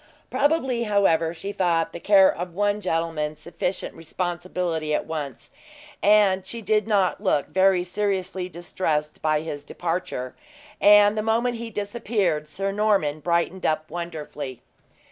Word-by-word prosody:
Probably, 265 Hz, -6 st, +1 dB
however, 180 Hz, -6 st, +2 dB
she 185 Hz, +4 st, -6 dB
thought 170 Hz, -4 st, 0 dB
the -, -, -6 dB
care 195 Hz, 0 st, +5 dB
of 175 Hz, 0 st, -6 dB
one 205 Hz, +1 st, +1 dB
gentleman 165 Hz, -4 st, -1 dB
sufficient 170 Hz, +4 st, -3 dB
responsibility 170 Hz, -2 st, -3 dB
at -, -, -2 dB
once; 145 Hz, -5 st, -6 dB, 0.5 s
and 200 Hz, -2 st, +4 dB
she 230 Hz, +5 st, -3 dB
did 215 Hz, 0 st, +1 dB
not 200 Hz, -3 st, +1 dB
look 170 Hz, -8 st, +1 dB
very 190 Hz, -1 st, +3 dB
seriously 185 Hz, -1 st, -2 dB
distressed 160 Hz, -3 st, -2 dB
by 155 Hz, -1 st, +1 dB
his 145 Hz, -3 st, -6 dB
departure; 165 Hz, -6 st, -3 dB, 0.5 s
and, 205 Hz, 0 st, +7 dB
the 215 Hz, -, 0 dB
moment 230 Hz, +2 st, +1 dB
he 230 Hz, 0 st, -6 dB
disappeared, 205 Hz, -7 st, -1 dB
Sir 195 Hz, +5 st, -2 dB
Norman 200 Hz, -8 st, +1 dB
brightened 170 Hz, +4 st, 0 dB
up 155 Hz, 0 st, -1 dB
wonderfully. 150 Hz, -7 st, -6 dB
180 Hz, 135 wpm, -24 LUFS, 160-205 Hz, 0.5 s, and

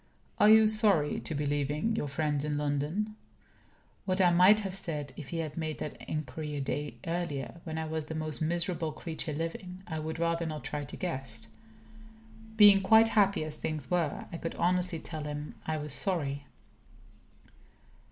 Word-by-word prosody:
"Are 210 Hz, -, +7 dB
you 220 Hz, 0 st, +8 dB
sorry 210 Hz, -9 st, +3 dB
to 155 Hz, -, -2 dB
be 145 Hz, +1 st, -1 dB
leaving 145 Hz, +9 st, 0 dB
your 150 Hz, -, -1 dB
friends 145 Hz, 0 st, -1 dB
in 150 Hz, -1 st, -1 dB
London?" 150 Hz, +9 st, -1 dB, 0.9 s
What 185 Hz, 0 st, 0 dB
I 180 Hz, -2 st, +5 dB
might 185 Hz, +5 st, +6 dB
have 195 Hz, -2 st, -4 dB
said 150 Hz, -7 st, -4 dB
if 150 Hz, -, -8 dB
he 170 Hz, -, -3 dB
had 155 Hz, -3 st, -3 dB
made 155 Hz, -2 st, -3 dB
that 150 Hz, -, -5 dB
inquiry 150 Hz, 0 st, -4 dB
a -, -, -2 dB
day 145 Hz, +2 st, -3 dB
earlier, 170 Hz, -2 st, -3 dB
when 160 Hz, -1 st, -4 dB
I 160 Hz, -, -2 dB
was 160 Hz, -1 st, -3 dB
the 160 Hz, -, -5 dB
most 155 Hz, -1 st, -4 dB
miserable 165 Hz, 0 st, -1 dB
creature 160 Hz, 0 st, -4 dB
living, 180 Hz, +4 st, -5 dB
I 160 Hz, -2 st, -4 dB
would 160 Hz, +1 st, -4 dB
rather 170 Hz, 0 st, 0 dB
not 155 Hz, -4 st, -5 dB
try 145 Hz, +2 st, -4 dB
to 140 Hz, -, -9 dB
guess. 130 Hz, -11 st, -5 dB, 1.1 s
Being 205 Hz, -2 st, +8 dB
quite 220 Hz, +3 st, +6 dB
happy 200 Hz, -5 st, +3 dB
as 155 Hz, -1 st, -7 dB
things 155 Hz, -5 st, -3 dB
were, 170 Hz, -5 st, 0 dB
I -, -, -3 dB
could 165 Hz, -, -4 dB
honestly 180 Hz, 0 st, +1 dB
tell 155 Hz, -2 st, -6 dB
him 150 Hz, 0 st, -5 dB
I 160 Hz, 0 st, 0 dB
was 150 Hz, -1 st, -4 dB
sorry. 145 Hz, -7 st, -2 dB
160 Hz, 175 wpm, -30 LUFS, 150-180 Hz, 1.1 s, you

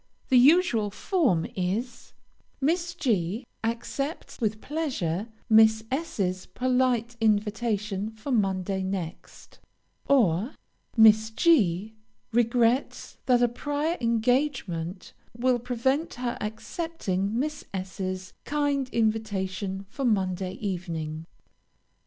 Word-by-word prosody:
The 255 Hz, -, +6 dB
usual 265 Hz, -, +5 dB
form 210 Hz, -, +1 dB
is: 220 Hz, +7 st, -3 dB, 0.5 s
Miss 340 Hz, +5 st, 0 dB
G 215 Hz, -, 0 dB, 0.2 s
accepts 245 Hz, +8 st, -3 dB
with 215 Hz, -1 st, 0 dB
pleasure 230 Hz, -, -2 dB, 0.2 s
Miss 220 Hz, -1 st, +6 dB
S 305 Hz, -1 st, -3 dB
's 185 Hz, -1 st, -1 dB
polite 250 Hz, -2 st, +1 dB
invitation 210 Hz, -1 st, 0 dB
for 220 Hz, +5 st, -7 dB
Monday 195 Hz, -4 st, 0 dB
next; 185 Hz, -3 st, -6 dB, 0.5 s
or, 225 Hz, -, +3 dB, 0.4 s
_Miss 220 Hz, 0 st, +6 dB
G 215 Hz, -, +3 dB, 0.4 s
regrets 240 Hz, +2 st, +1 dB
that 245 Hz, -1 st, +4 dB
a -, -, +5 dB
prior 290 Hz, +7 st, -2 dB
engagement 230 Hz, -, 0 dB, 0.2 s
will 250 Hz, 0 st, +2 dB
prevent 265 Hz, +6 st, -1 dB
her 240 Hz, 0 st, -2 dB
accepting 220 Hz, -, -3 dB
Miss 300 Hz, +3 st, -2 dB
S 190 Hz, 0 st, -6 dB
's 185 Hz, 0 st, -4 dB
kind 285 Hz, -3 st, 0 dB
invitation 200 Hz, -4 st, -1 dB
for 275 Hz, +8 st, -6 dB
Monday 190 Hz, -5 st, 0 dB
evening. 165 Hz, -5 st, -4 dB
220 Hz, 100 wpm, -27 LUFS, 190-255 Hz, 0.5 s, The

